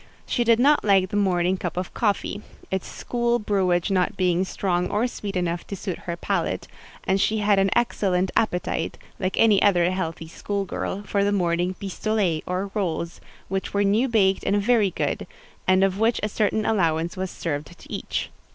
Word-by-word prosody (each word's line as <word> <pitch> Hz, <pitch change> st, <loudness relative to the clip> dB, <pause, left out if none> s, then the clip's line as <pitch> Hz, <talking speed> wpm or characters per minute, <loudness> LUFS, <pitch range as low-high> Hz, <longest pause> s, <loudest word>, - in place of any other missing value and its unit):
She 240 Hz, -, 0 dB
did 230 Hz, -1 st, +4 dB
not 290 Hz, +4 st, +4 dB
like 195 Hz, -3 st, +4 dB
the -, -, -3 dB
morning 185 Hz, -2 st, +2 dB
cup 175 Hz, -1 st, -4 dB
of 180 Hz, 0 st, -3 dB
coffee; 205 Hz, -2 st, -1 dB, 0.3 s
its 190 Hz, -1 st, -2 dB
school 240 Hz, 0 st, -1 dB
brewage 190 Hz, -4 st, +1 dB
not 190 Hz, +2 st, +1 dB
being 180 Hz, -1 st, +2 dB
strong 180 Hz, -2 st, -1 dB
or 210 Hz, +4 st, +1 dB
sweet 210 Hz, -5 st, -5 dB
enough 175 Hz, -1 st, -1 dB
to 200 Hz, -, -4 dB
suit 185 Hz, -2 st, -5 dB
her 170 Hz, -, -2 dB
palate; -, -, -2 dB, 0.4 s
and 190 Hz, +1 st, +1 dB
she 220 Hz, -, +2 dB
had 205 Hz, -1 st, +3 dB
an 195 Hz, 0 st, +3 dB
excellent 190 Hz, -6 st, +1 dB
appetite, 180 Hz, -5 st, 0 dB, 0.2 s
like 185 Hz, -1 st, -1 dB
any 215 Hz, -3 st, +5 dB
other 180 Hz, -3 st, +4 dB
healthy 165 Hz, -3 st, -3 dB
school 200 Hz, +4 st, -3 dB
girl, 195 Hz, +2 st, -4 dB
for 200 Hz, -1 st, 0 dB
the 205 Hz, -, +2 dB
morning 175 Hz, -1 st, +1 dB
pistolets 195 Hz, -3 st, -1 dB
or 185 Hz, +2 st, -2 dB
rolls, 170 Hz, -4 st, -2 dB, 0.3 s
which 195 Hz, +1 st, -3 dB
were 200 Hz, -, +3 dB
new 210 Hz, +6 st, +3 dB
baked 195 Hz, -5 st, +2 dB
and 205 Hz, -, +2 dB
very 215 Hz, -1 st, +3 dB
good, -, -, -2 dB, 0.4 s
and 185 Hz, +1 st, +5 dB
of 195 Hz, 0 st, +1 dB
which 225 Hz, +2 st, +2 dB
a 210 Hz, -, 0 dB
certain 215 Hz, +1 st, 0 dB
allowance 170 Hz, -3 st, +1 dB
was 190 Hz, 0 st, -3 dB
served 150 Hz, -4 st, -4 dB
to -, -, -12 dB
each. -, -, -3 dB
195 Hz, 185 wpm, -24 LUFS, 180-210 Hz, 0.4 s, any